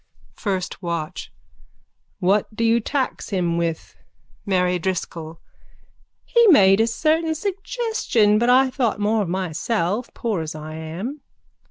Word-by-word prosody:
FIRST 190 -4 -3
WATCH: 170 -1 -4 0.9
What 200 +3 +1
do 230 - -1
you 230 +1 +4
tax 265 +3 -2
him 175 -4 0
with? 170 -1 -3 0.5
MARY 180 -2 +1
DRISCOLL: 165 -2 -4 0.9
He 470 -1 +4
made 195 - +6
a 225 - +3
certain 315 +7 +1
suggestion 390 - 0
but 240 +1 +2
I 260 +1 +5
thought 240 -6 0
more 215 +1 +1
of 190 - -2
myself 185 +5 -1
as - - -34
poor 215 -7 -2
as 155 -1 -5
I 155 0 -7
am. 175 - -6
205 Hz, 135 wpm, -22 LUFS, 175-250 Hz, 0.9 s, made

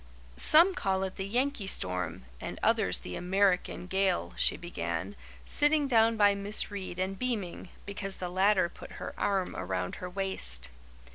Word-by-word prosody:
"Some 340 +5 +7
call 190 - -1
it 190 -1 -4
the 190 - -3
'Yankee 245 -1 -1
Storm,' 90 - +1 0.2
and - - -6
others - - +2
the 90 - -7
'American 185 -1 +1
Gale,'" 190 0 0
she - - +2
began, 95 - -4 0.3
sitting 295 0 +3
down 225 -2 +4
by 205 -1 +5
Miss 200 +2 -1
Reade 190 -3 -6
and 190 +1 -3
beaming, 210 -8 -3 0.2
because 195 -1 -5
the 180 - -5
latter 190 +1 +3
put - - -12
her - - -7
arm 195 -2 -1
around 90 0 -3
her 180 - -6
waist. 65 - -2
190 Hz, 155 wpm, -30 LUFS, 175-205 Hz, 0.3 s, Some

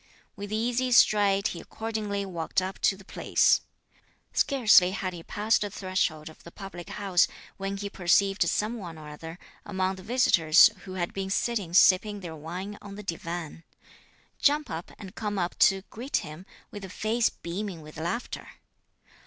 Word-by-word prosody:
With 205 0 -7
easy 245 +3 0
stride, 200 -3 +4
he 170 - -6
accordingly 215 -3 -4
walked 170 -3 -1
up 190 +1 -5
to 195 - +3
the 195 - -15
place. - - +2 0.7
Scarcely 220 -9 +5
had 185 -2 -3
he 170 - -8
passed 210 +6 0
the 205 - -1
threshold 185 -6 -2
of 160 - -13
the - - -10
public 185 -3 -9
house, 195 -4 +2 0.3
when 195 0 -3
he 200 +1 -4
perceived 195 +1 +2
some 220 +3 -1
one 170 -5 -8
or 155 -1 -10
other 160 +3 -9 0.3
among 190 -2 -2
the - - -10
visitors 180 -8 +5
who 185 - -7
had 175 -2 -2
been 195 0 -3
sitting 200 -4 -1
sipping 200 +2 +5
their 165 -3 -7
wine 180 +7 -7
on 200 -1 -9
the 210 - -8
divan, 170 -2 -5 0.8
jump 295 +1 +2
up 165 +1 -5
and 195 -3 -10
come 210 -2 -3
up 175 -1 -1
to 195 0 +4
greet 250 +6 -2
him, 155 +5 -10 0.2
with 205 -1 -8
a 190 - -7
face 220 +5 +1
beaming 180 0 -6
with 155 0 -12
laughter. 175 +10 -4
195 Hz, 170 wpm, -27 LUFS, 175-210 Hz, 0.8 s, Scarcely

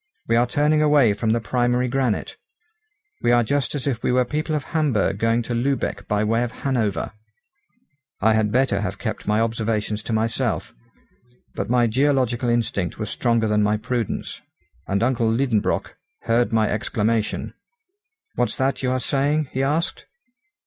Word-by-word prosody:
We 115 - +2
are 120 +1 +3
turning 150 +4 +2
away 145 -7 +4
from 110 +2 -2
the 115 +2 +2
primary 125 +2 +1
granite. 125 -3 -1 0.9
We 120 - +2
are 120 0 +4
just 140 +3 -1
as 140 - -3
if 125 -5 -1
we - - 0
were 125 0 +3
people 155 +3 -2
of 150 - -2
Hamburg 135 - 0
going 115 +1 +2
to 120 - -4
Lübeck 130 +4 -1
by 105 0 +1
way 115 +2 +1
of 120 - -3
Hanover!" 110 -10 0 1.1
I 110 +2 +4
had 110 -1 +1
better 125 -5 +2
have 100 -1 -3
kept 110 -1 -5
my 105 +1 +2
observations 110 -2 -1
to 115 - -6
myself. 110 +1 -1 0.8
But - - -4
my 120 0 +3
geological 125 0 +1
instinct 115 -6 -1
was 110 -2 -4
stronger 115 -2 +1
than 105 0 +2
my 105 +1 +2
prudence, 115 0 -3 0.5
and 100 +3 0
uncle 120 -2 +1
Liedenbrock 115 -2 0 0.3
heard 115 0 +2
my 110 -1 +2
exclamation. 110 +1 -1 0.8
"What's 125 - -1
that 135 +1 0
you 130 - 0
are 130 0 0
saying?" 140 +3 0
he 130 - -1
asked. 155 +5 -1
120 Hz, 165 wpm, -22 LUFS, 110-130 Hz, 1.1 s, away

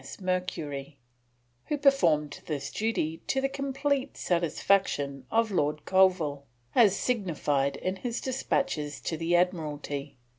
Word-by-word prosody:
M.S. 135 - -10
Mercury, 165 -7 -3 0.7
who 295 - 0
performed 170 - +3
this 145 -3 -3
duty 165 -8 -1
to 270 - +1
the 270 - +1
complete 275 0 -1
satisfaction 170 -5 +1
of 225 -1 +2
Lord 150 -4 0
Colville 180 -7 +3 0.3
as 210 -5 +6
signified 150 - 0
in 185 +5 -3
his 235 +3 -3
despatches 240 - -1
to 165 - -2
the 165 +2 +1
Admiralty. 150 -6 -1
175 Hz, 120 wpm, -28 LUFS, 145-230 Hz, 0.7 s, as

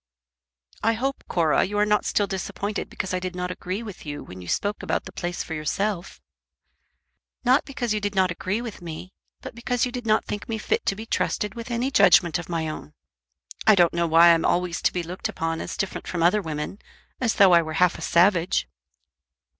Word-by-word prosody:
"I 225 - +3
hope, 270 +4 -2
Cora, 165 -3 +2
you 205 +2 -3
are 210 - +4
not 210 0 +2
still 205 - +1
disappointed 200 +2 -4
because 190 -2 -4
I 185 - 0
did 180 0 -5
not 180 0 -3
agree 185 +4 -4
with 210 -5 -9
you 145 -1 -6
when 90 0 -10
you 90 - -10
spoke 205 - -1
about - - -2
the 185 - -8
place 175 -1 -4
for 160 - -7
yourself." 175 +5 -2 1.3
"Not 255 +4 +4
because 255 -5 -2
you 215 - 0
did 205 0 -2
not 185 -1 +3
agree 185 +5 -2
with 230 -6 -7
me, 170 +2 -8 0.3
but - - -8
because 240 +1 -1
you 250 - -4
did 245 -2 -6
not 215 0 +3
think 205 - -5
me 225 - -1
fit 215 - -1
to 195 - +2
be 220 +3 -7
trusted 210 -2 -1
with 235 0 -8
any 240 +3 -1
judgment 175 - +5
of 175 - -8
my 165 -2 -1
own. 115 - -7 0.7
I 215 - +8
don't 175 -3 +4
know 170 0 +1
why 165 +1 +7
I'm 165 -1 +4
always 175 -1 0
to - - +2
be 180 - -2
looked 180 +6 -4
upon 165 -5 -3
as - - -6
different 195 -2 -3
from 170 -2 -1
other 185 +5 +4
women, 155 +3 -5 0.4
as 240 -4 +1
though 195 -2 +6
I 170 - +7
were 160 -1 -5
half 180 +1 +2
a - - -9
savage." 175 +1 +3
185 Hz, 215 wpm, -24 LUFS, 170-215 Hz, 1.3 s, I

